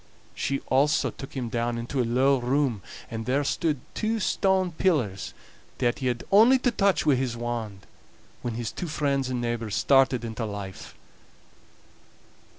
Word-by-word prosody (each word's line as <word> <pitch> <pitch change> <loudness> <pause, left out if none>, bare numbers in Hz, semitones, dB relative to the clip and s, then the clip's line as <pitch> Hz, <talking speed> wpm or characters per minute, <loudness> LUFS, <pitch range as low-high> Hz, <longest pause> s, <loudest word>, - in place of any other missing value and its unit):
She 135 0 -2
also 140 +3 +2
took 135 - -10
him 125 -2 -2
down 120 +1 -1
into 120 +3 -2
a - - +2
low 130 +3 +3
room, 125 -3 0 0.3
and 115 0 -5
there 135 +3 +2
stood 150 0 0
two 220 +1 -1
stone 190 -2 +1
pillars 145 - 0 0.4
that 120 -2 0
he 130 - -1
had 120 -1 -1
only 225 +6 +7
to 250 -1 +1
touch 200 -6 +2
wi' 150 - +5
his 125 -2 -1
wand, 115 -4 -4 0.6
when 120 -2 -3
his 115 -1 -3
two 180 - -5
friends 140 -4 0
and 125 -1 -2
neighbors 115 -3 -2
started 130 -3 +3
into 115 0 -4
life. 100 -3 -7
130 Hz, 155 wpm, -26 LUFS, 115-150 Hz, 0.6 s, only